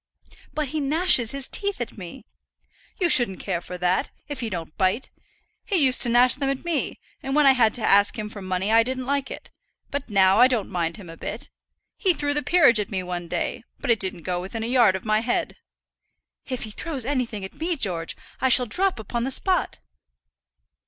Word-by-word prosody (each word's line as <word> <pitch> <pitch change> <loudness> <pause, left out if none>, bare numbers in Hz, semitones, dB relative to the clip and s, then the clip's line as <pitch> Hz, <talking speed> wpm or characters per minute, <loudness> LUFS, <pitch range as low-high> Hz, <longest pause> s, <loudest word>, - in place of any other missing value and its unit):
"But 305 -3 -3
he 310 - -3
gnashes 295 -4 +3
his 275 0 -4
teeth 405 -1 -2
at 240 - -5
me." 180 -5 -10 0.7
"You 360 - +3
shouldn't 240 - +5
care 180 -4 -3
for 180 - -8
that, 180 +1 0 0.2
if 290 -2 -6
he 235 -3 -3
don't 165 -5 -6
bite. 190 +6 0 0.5
He 405 - -2
used 265 -7 +4
to 240 - +6
gnash 245 +1 +5
them 275 0 -1
at 275 +4 -3
me; 335 -4 -2 0.2
and 270 +1 -3
when 300 -1 +4
I 270 - +8
had 235 -5 +3
to 235 - -2
ask 200 +4 +4
him 215 -1 -4
for 210 -1 -10
money 185 +2 -2
I 225 +1 +6
didn't 255 +2 -3
like 280 0 -1
it; - - -10 0.4
but 285 -3 -4
now 195 0 +4
I 250 - +8
don't 235 -7 -2
mind 170 -2 -2
him 195 - -11
a 165 0 -11
bit. - - -6 0.5
He 370 -5 +2
threw 290 -1 -1
the 295 - 0
peerage 295 -10 +4
at 205 - -3
me 190 -3 -3
one 175 -1 -5
day, 195 - -3 0.2
but 265 - 0
it 225 - +3
didn't 185 -3 -3
go 180 0 -2
within 220 +5 -5
a - - -2
yard 235 -5 +4
of 190 - -6
my 215 0 +2
head." 235 +2 -2 0.9
"If 255 -2 -4
he 215 - -6
throws 275 0 -5
anything 245 -7 -2
at 190 - -10
me, 335 +2 -2
George, 180 - -3 0.2
I 260 - +2
shall 250 0 +6
drop 370 - 0
upon 235 +2 -4
the 260 - -1
spot." 365 +7 -1
235 Hz, 215 wpm, -24 LUFS, 195-275 Hz, 0.9 s, I